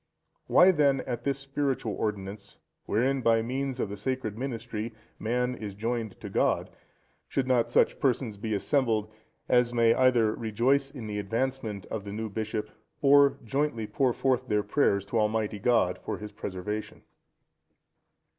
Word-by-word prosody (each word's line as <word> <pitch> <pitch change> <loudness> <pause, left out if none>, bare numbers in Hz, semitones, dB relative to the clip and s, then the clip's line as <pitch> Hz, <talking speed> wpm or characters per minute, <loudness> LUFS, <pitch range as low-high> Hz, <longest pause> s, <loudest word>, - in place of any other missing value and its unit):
Why, 185 +2 +7
then, 140 -5 +3
at 120 -2 -5
this 140 -1 +1
spiritual 135 -5 -2
ordinance, 100 -1 -4 0.3
wherein, 130 +5 +1
by 115 -1 +3
means 130 +2 -3
of 105 - -1
the 100 - -5
sacred 110 0 -3
ministry, 115 -2 -4 0.3
man 125 +3 0
is 105 -5 -7
joined 115 -1 -3
to - - -6
God, - - +1 0.6
should 135 - -1
not 120 -2 +2
such - - +3
persons 125 -4 0
be 110 +1 -2
assembled, 110 0 +1 0.4
as 125 -1 +3
may 115 -1 +5
either 120 -4 +3
rejoice 125 +6 +1
in 130 -5 -8
the 105 -1 -3
advancement 115 -1 -2
of 110 -3 -3
the 100 0 -7
new 110 +1 -3
bishop, 110 0 -3 0.3
or 140 0 +6
jointly 135 -2 -1
pour 130 +3 +1
forth 130 +1 0
their 105 -2 +1
prayers 100 -3 +2
to 110 +3 0
Almighty 105 -1 0
God 100 -5 +2
for - - -3
his 105 0 -8
preservation? 105 +1 -5
115 Hz, 155 wpm, -28 LUFS, 105-130 Hz, 0.6 s, Why